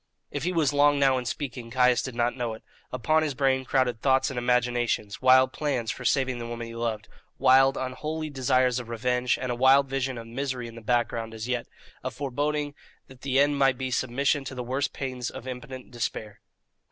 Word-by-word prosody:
If - - -3
he 180 - +1
was 160 -5 +1
long 145 0 +4
now 135 -2 +3
in 125 - -7
speaking, 125 -3 -5
Caius 125 0 +3
did 130 -3 -6
not 120 0 0
know 120 -3 -3
it. 110 - -15 0.3
Upon 155 +6 +2
his 150 -3 -2
brain 130 -1 +1
crowded 125 -5 +1
thoughts 135 0 +3
and 125 - -3
imaginations: 120 -4 0
wild 130 0 +5
plans 135 -7 -1
for - - -8
saving 130 -3 +1
the 115 - -5
woman 120 0 -5
he 115 - -9
loved; 115 -2 -3 0.3
wild, 135 +1 +5
unholy 150 +4 -4
desires 130 -2 +2
of 120 -2 -8
revenge; 125 +1 0
and 125 -1 -2
a - - -1
wild 135 +3 +5
vision 135 -1 -2
of 115 - -7
misery 125 +1 -4
in 115 - -10
the 115 - -10
background 115 -1 -1
as 110 +1 -5
yet 125 -2 -2 0.4
a - - -1
foreboding 145 +2 -2 0.4
that 130 -1 -15
the 135 -1 +1
end 145 0 +3
might 135 -2 +3
be 130 0 -3
submission 135 +3 0
to 135 - -6
the 125 - -4
worst 130 +3 -1
pains 130 -3 -4
of 130 -1 -9
impotent 130 0 -8
despair. 110 -3 -4
130 Hz, 205 wpm, -26 LUFS, 120-135 Hz, 0.4 s, wild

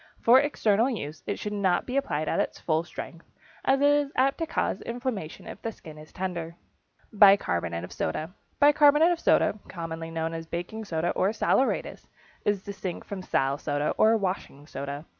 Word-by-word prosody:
For 245 +3 +7
external 235 -5 +2
use 155 - -5
it 200 - -2
should 210 - -4
not 190 -3 +1
be 255 - -5
applied 155 - -1
at - - 0
full 160 0 +1
strength, 170 -1 -9 0.3
as 270 +1 +2
it 285 - +5
is 290 -1 +2
apt 270 +4 +2
to 330 - -1
cause - - -1
inflammation 235 - -5
if - - -9
the 225 - -3
skin 155 -7 -12
is 155 - -13
tender. 175 -3 -4 0.6
=Bicarbonate 90 - +4
of 90 - -8
Soda.= 155 - -3 0.3
Bicarbonate 295 +2 +6
of 345 - -1
soda, 215 - +2
commonly 165 -2 -6
known 165 0 -3
as 165 0 -6
baking 175 +7 -5
soda 165 -2 -1
or 190 - +1
saleratus, 260 +4 0 0.4
is 205 -2 +1
distinct 190 -3 -6
from 200 -2 -6
sal 135 -5 0
soda 145 0 -1
or 225 +1 +4
washing 185 -8 -4
soda. 140 +1 -6
190 Hz, 175 wpm, -27 LUFS, 160-235 Hz, 0.6 s, For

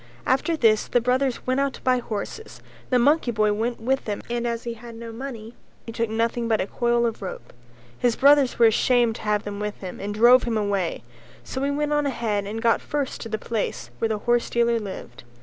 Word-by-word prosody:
After 315 +6 +1
this 220 -6 +3
the 245 - +2
brothers 250 +1 0
went 255 +1 +1
out 275 -1 0
to - - -11
buy 255 -1 +3
horses, 235 - -6
and - - -23
the 255 - +3
monkey 280 +2 +3
boy 215 -2 +2
went 230 +3 -2
with 265 +4 0
them 205 -2 -4
and 240 0 -1
as 235 0 -3
he 235 - -4
had 230 0 -11
no 230 0 -8
money 230 -2 -7 0.3
he 230 - -6
took 230 0 -2
nothing 230 +1 -1
but 220 -2 +2
a - - 0
coil 235 +3 +1
of 230 -2 -3
rope; 190 - -7 0.5
his 240 -2 +2
brothers 280 -2 +5
were 235 - +6
ashamed 235 +1 +3
to - - -11
have 210 -1 0
him 205 0 -5
with 210 0 -4
them 185 -2 -7
and 205 +1 -4
drove 240 +3 +7
him 230 -2 -1
away, 200 -5 -1 0.4
so 260 - -5
he 280 - +1
went 295 +1 -1
on 295 -1 +1
ahead 220 -6 -1
and 225 +3 -5
got 230 -1 +3
first 285 -3 -3
to 225 - -6
the 220 - -1
place 210 - -3
where 225 - 0
the 215 -1 -2
horsedealer 235 -1 +1
lived. 160 - -8
235 Hz, 225 wpm, -24 LUFS, 215-250 Hz, 0.5 s, drove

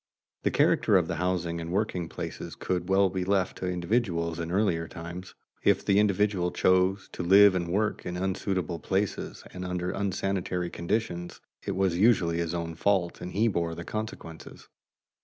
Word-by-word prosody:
The - - +1
character - - +3
of - - +1
the - - -3
housing 85 -1 -1
and 85 +1 -5
working 95 -4 -1
places - - -6
could 90 0 -2
well 95 -1 +4
be 95 -1 -2
left 95 -1 0
to 90 - -3
individuals 85 -3 -1
in 85 0 -3
early 100 -1 +2
times. 85 +2 -8 0.3
If - - +3
the 100 0 +4
individual 100 -3 +2
chose 95 +2 +2
to - - -5
live 100 +3 +7
and 90 -2 -1
work 105 +5 0
in 90 0 -4
unsuitable 95 -2 -2
places 95 +4 -2
and 90 - -6
under 90 0 -2
unsanitary 95 -2 -2
conditions, 90 -1 -3 0.3
it 100 - -1
was 95 -2 +1
usually 90 -6 +3
his 85 0 -2
own 85 -1 -3
fault 90 +1 0
and 90 - -5
he 110 +4 +2
bore 85 -5 -1
the 85 - -6
consequences. 110 -7 -7
90 Hz, 170 wpm, -28 LUFS, 85-100 Hz, 0.3 s, live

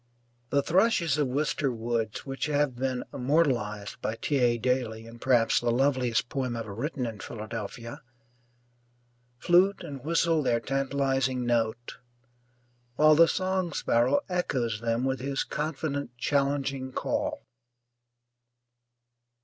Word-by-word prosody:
The 140 -1 +2
thrushes 170 -4 +2
of 145 - +2
Wister 140 +1 0
Woods, 115 -2 -3
which 135 +1 -3
have 145 -3 +1
been 130 0 -2
immortalized 125 -8 0
by 110 - -2
T. 140 +4 -1
A. 120 -1 +3
Daly 120 -2 -1
in 115 +1 -12
perhaps 120 -3 +3
the 120 - -1
loveliest 125 -2 +1
poem 130 -3 -2
ever 110 -3 -5
written 130 +3 -3
in 110 -3 -5
Philadelphia, 115 +2 -7 1.4
flute 180 +8 +3
and 140 -3 -7
whistle 165 0 +2
their 120 -4 +1
tantalizing 135 -1 0
note, 120 0 -1 1.0
while 155 +2 +6
the 165 +2 +7
song 185 -2 -1
sparrow 125 +2 +2
echoes 125 - -1
them 115 +1 0
with 130 0 0
his 135 +1 -1
confident, 145 -4 -3
challenging 140 0 0
call. 295 - -2
130 Hz, 120 wpm, -28 LUFS, 120-145 Hz, 1.4 s, the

